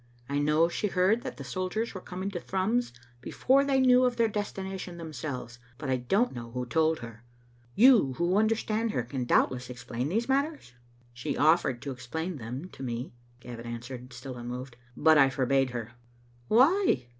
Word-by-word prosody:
I 140 Hz, 0 st, -1 dB
know 150 Hz, +3 st, +3 dB
she 190 Hz, +4 st, -2 dB
heard 190 Hz, +4 st, +2 dB
that -, -, -7 dB
the -, -, -7 dB
soldiers 185 Hz, +5 st, -3 dB
were 185 Hz, -, -7 dB
coming 185 Hz, +3 st, -5 dB
to 180 Hz, -, -4 dB
Thrums 195 Hz, +8 st, -1 dB, 0.3 s
before 270 Hz, -, +2 dB
they 275 Hz, -1 st, +2 dB
knew 255 Hz, -1 st, +5 dB
of 250 Hz, -1 st, +2 dB
their 230 Hz, -1 st, +4 dB
destination 190 Hz, -4 st, -5 dB
themselves, 130 Hz, -6 st, -6 dB, 0.2 s
but 135 Hz, -1 st, -3 dB
I 130 Hz, -, +2 dB
don't 195 Hz, -, +1 dB
know 120 Hz, -1 st, -7 dB
who 125 Hz, +1 st, -4 dB
told 160 Hz, +4 st, +2 dB
her. 115 Hz, -1 st, -10 dB, 0.5 s
You 225 Hz, -, +6 dB
who 170 Hz, +6 st, 0 dB
understand 220 Hz, +1 st, +1 dB
her 125 Hz, -, 0 dB
can 125 Hz, +1 st, -4 dB
doubtless 125 Hz, +1 st, +1 dB
explain 125 Hz, +1 st, -4 dB
these 225 Hz, +7 st, 0 dB
matters?" 280 Hz, -, -1 dB, 0.2 s
" 120 Hz, 0 st, -31 dB
She 120 Hz, +1 st, -4 dB
oflEered 150 Hz, -5 st, +3 dB
to 140 Hz, -1 st, -5 dB
explain 160 Hz, +7 st, -5 dB
them 125 Hz, +7 st, -6 dB
to -, -, -13 dB
me," 120 Hz, -1 st, -4 dB, 0.3 s
Gavin 120 Hz, -1 st, -8 dB
answered, 125 Hz, +2 st, -7 dB
still 125 Hz, +1 st, -8 dB
unmoved, 125 Hz, +1 st, -6 dB, 0.2 s
" -, -, -27 dB
but 155 Hz, -1 st, +8 dB
I 135 Hz, -1 st, +6 dB
forbade 135 Hz, 0 st, +1 dB
her." 120 Hz, -2 st, -5 dB, 0.6 s
"Why?" 265 Hz, -, +4 dB
150 Hz, 180 wpm, -28 LUFS, 125-205 Hz, 0.6 s, but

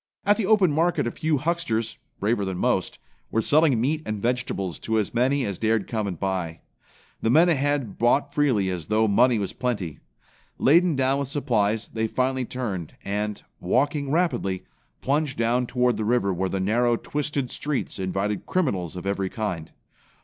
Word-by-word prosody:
At 205 Hz, +1 st, +5 dB
the 215 Hz, -5 st, -1 dB
open 205 Hz, -6 st, +4 dB
market 165 Hz, 0 st, +1 dB
a 120 Hz, -, -1 dB
few 155 Hz, +3 st, 0 dB
hucksters, 130 Hz, -8 st, -1 dB, 0.2 s
braver 105 Hz, +1 st, +1 dB
than 95 Hz, -2 st, -3 dB
most, -, -, 0 dB, 0.3 s
were 115 Hz, -, 0 dB
selling 150 Hz, -5 st, +4 dB
meat 150 Hz, +6 st, 0 dB
and 110 Hz, -5 st, -3 dB
vegetables 115 Hz, -6 st, -2 dB
to 110 Hz, 0 st, -1 dB
as 105 Hz, -, -1 dB
many 130 Hz, +3 st, +2 dB
as 100 Hz, -3 st, -4 dB
dared 110 Hz, -2 st, +1 dB
come 110 Hz, -3 st, -2 dB
and 90 Hz, -4 st, -5 dB
buy. 90 Hz, -4 st, -2 dB, 0.6 s
The 115 Hz, -, +1 dB
men 165 Hz, +8 st, +6 dB
ahead 145 Hz, -, 0 dB
bought 140 Hz, +4 st, +2 dB
freely 125 Hz, -11 st, +2 dB
as 85 Hz, -4 st, -5 dB
though 110 Hz, +1 st, +2 dB
money 120 Hz, +4 st, +4 dB
was 100 Hz, -2 st, -3 dB
plenty. 105 Hz, -, -3 dB, 0.6 s
Laden 170 Hz, +3 st, +4 dB
down 135 Hz, +1 st, +1 dB
with 140 Hz, -, -2 dB
supplies, 115 Hz, -7 st, 0 dB
they 110 Hz, 0 st, -1 dB
finally 130 Hz, +2 st, 0 dB
turned 105 Hz, -11 st, -4 dB
and, 105 Hz, +1 st, -3 dB, 0.2 s
walking 140 Hz, -, 0 dB
rapidly, 145 Hz, -, 0 dB, 0.4 s
plunged 145 Hz, 0 st, 0 dB
down 120 Hz, +2 st, +1 dB
toward 125 Hz, -3 st, +1 dB
the 110 Hz, -, -1 dB
river 105 Hz, -3 st, +1 dB
where 95 Hz, +2 st, -1 dB
the 95 Hz, -, -2 dB
narrow, 120 Hz, +5 st, +2 dB
twisted 145 Hz, -2 st, -3 dB
streets 145 Hz, -8 st, -2 dB
invited 95 Hz, +2 st, -2 dB
criminals 100 Hz, -, -1 dB
of 90 Hz, -, -6 dB
every 100 Hz, -1 st, -1 dB
kind. 95 Hz, -8 st, -4 dB
120 Hz, 170 wpm, -25 LUFS, 100-140 Hz, 0.6 s, men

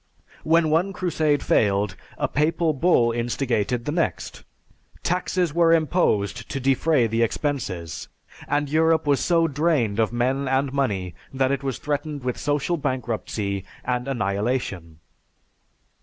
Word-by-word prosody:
When 160 Hz, 0 st, +3 dB
one 180 Hz, +5 st, +2 dB
crusade 155 Hz, -5 st, 0 dB
failed, 100 Hz, -1 st, +2 dB, 0.2 s
a -, -, 0 dB
papal 160 Hz, +2 st, +1 dB
bull 130 Hz, -6 st, +3 dB
instigated 120 Hz, -1 st, -1 dB
the 150 Hz, -, -1 dB
next. 165 Hz, +1 st, -2 dB, 0.6 s
Taxes 180 Hz, -2 st, 0 dB
were 165 Hz, 0 st, +4 dB
imposed 140 Hz, -, +1 dB
to 135 Hz, -, -3 dB
defray 135 Hz, +1 st, +2 dB
the 115 Hz, +1 st, 0 dB
expenses, 105 Hz, -, -2 dB, 0.4 s
and 145 Hz, 0 st, 0 dB
Europe 160 Hz, +2 st, +2 dB
was 145 Hz, -2 st, +3 dB
so 165 Hz, -2 st, +2 dB
drained 145 Hz, -8 st, +1 dB
of 110 Hz, -1 st, +2 dB
men 130 Hz, +3 st, 0 dB
and 135 Hz, +1 st, 0 dB
money 100 Hz, -11 st, -1 dB, 0.2 s
that 130 Hz, 0 st, +1 dB
it 140 Hz, -1 st, -1 dB
was 135 Hz, -3 st, -3 dB
threatened 145 Hz, -1 st, -3 dB
with 125 Hz, -1 st, -2 dB
social 145 Hz, +4 st, 0 dB
bankruptcy 110 Hz, -, -3 dB, 0.2 s
and 125 Hz, 0 st, -1 dB
annihilation. 100 Hz, -, -2 dB
135 Hz, 130 wpm, -24 LUFS, 115-155 Hz, 0.6 s, were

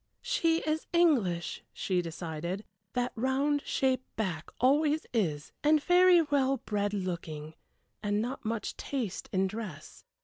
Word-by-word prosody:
"She 335 Hz, -10 st, +2 dB
is 310 Hz, 0 st, -1 dB
English," 235 Hz, -, +2 dB
she 185 Hz, -2 st, 0 dB
decided; 170 Hz, +3 st, -4 dB, 0.3 s
"that 245 Hz, 0 st, 0 dB
round 270 Hz, +4 st, +1 dB
shaped 260 Hz, -1 st, 0 dB
back 185 Hz, -7 st, -2 dB
always 295 Hz, +4 st, +3 dB
is 155 Hz, -10 st, 0 dB
and 305 Hz, +1 st, +5 dB
very 355 Hz, -1 st, +6 dB
well 275 Hz, -2 st, +2 dB
bred 205 Hz, -3 st, -1 dB
looking, 165 Hz, -5 st, -4 dB, 0.5 s
and 205 Hz, -1 st, 0 dB
not 245 Hz, +5 st, -3 dB
much 225 Hz, -2 st, -2 dB
taste 240 Hz, -9 st, -3 dB
in 190 Hz, 0 st, +2 dB
dress. 190 Hz, -7 st, -7 dB
230 Hz, 130 wpm, -30 LUFS, 185-290 Hz, 0.5 s, very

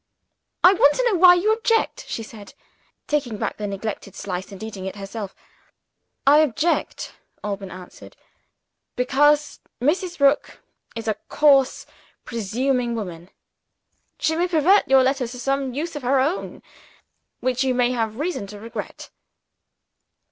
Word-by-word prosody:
"I 360 Hz, -, +8 dB
want 290 Hz, -6 st, +4 dB
to -, -, 0 dB
know 400 Hz, -7 st, +1 dB
why 355 Hz, 0 st, +9 dB
you 410 Hz, +5 st, +2 dB
object," 450 Hz, 0 st, 0 dB
she 225 Hz, -, -4 dB
said; 215 Hz, -2 st, -12 dB, 0.5 s
taking 265 Hz, -7 st, -1 dB
back -, -, -3 dB
the 210 Hz, -, -4 dB
neglected 200 Hz, -1 st, -5 dB
slice, 185 Hz, 0 st, -5 dB
and 195 Hz, +2 st, -9 dB
eating 200 Hz, -4 st, -7 dB
it 190 Hz, -, -6 dB
herself. 200 Hz, 0 st, -7 dB, 0.9 s
"I 290 Hz, +2 st, +7 dB
object," 310 Hz, +3 st, 0 dB, 0.3 s
Alban 200 Hz, -2 st, -4 dB
answered, 180 Hz, 0 st, -12 dB, 0.8 s
"because 290 Hz, +4 st, +2 dB, 0.2 s
Mrs. 345 Hz, +7 st, 0 dB
Rook 280 Hz, +1 st, +2 dB, 0.3 s
is 230 Hz, 0 st, -6 dB
a 215 Hz, -1 st, 0 dB
coarse 275 Hz, -3 st, +3 dB, 0.4 s
presuming 240 Hz, +2 st, -1 dB
woman. 180 Hz, -5 st, -6 dB, 0.9 s
She 320 Hz, -, 0 dB
may 350 Hz, +2 st, +1 dB
pervert 355 Hz, +4 st, +4 dB
your 265 Hz, 0 st, +5 dB
letter 265 Hz, -1 st, 0 dB
to 250 Hz, +2 st, -9 dB
some 270 Hz, 0 st, -1 dB
use 320 Hz, +3 st, -4 dB
of 295 Hz, -, -5 dB
her 260 Hz, +2 st, +2 dB
own, 300 Hz, +8 st, -2 dB, 0.8 s
which 255 Hz, 0 st, 0 dB
you 260 Hz, -1 st, +1 dB
may 245 Hz, 0 st, +2 dB
have 225 Hz, -3 st, -2 dB
reason 305 Hz, -, -3 dB
to 205 Hz, +1 st, -10 dB
regret." 230 Hz, +2 st, -8 dB
255 Hz, 140 wpm, -22 LUFS, 215-300 Hz, 0.9 s, why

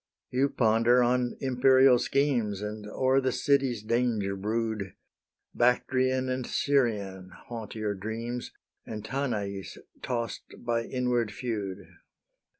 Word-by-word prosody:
You 135 Hz, +3 st, +2 dB
ponder 115 Hz, +1 st, +4 dB
on 125 Hz, 0 st, +1 dB
imperial 130 Hz, -1 st, +5 dB
schemes, 120 Hz, -8 st, +1 dB
And 105 Hz, 0 st, -5 dB
o'er 130 Hz, +5 st, +2 dB
the 130 Hz, 0 st, +1 dB
city's 135 Hz, -5 st, +1 dB
danger 110 Hz, -4 st, 0 dB
brood: 105 Hz, -1 st, -2 dB, 0.6 s
Bactrian 130 Hz, +1 st, +2 dB
and 130 Hz, -1 st, -2 dB
Serian 105 Hz, -9 st, 0 dB, 0.2 s
haunt 115 Hz, -3 st, -6 dB
your 105 Hz, -2 st, -1 dB
dreams, 115 Hz, +5 st, -5 dB, 0.3 s
And 110 Hz, -1 st, -7 dB
Tanais, 105 Hz, -7 st, -3 dB, 0.3 s
toss'd 120 Hz, -1 st, -5 dB
by 115 Hz, -1 st, 0 dB
inward 125 Hz, -3 st, 0 dB
feud. 105 Hz, -5 st, -4 dB
120 Hz, 110 wpm, -28 LUFS, 105-130 Hz, 0.6 s, imperial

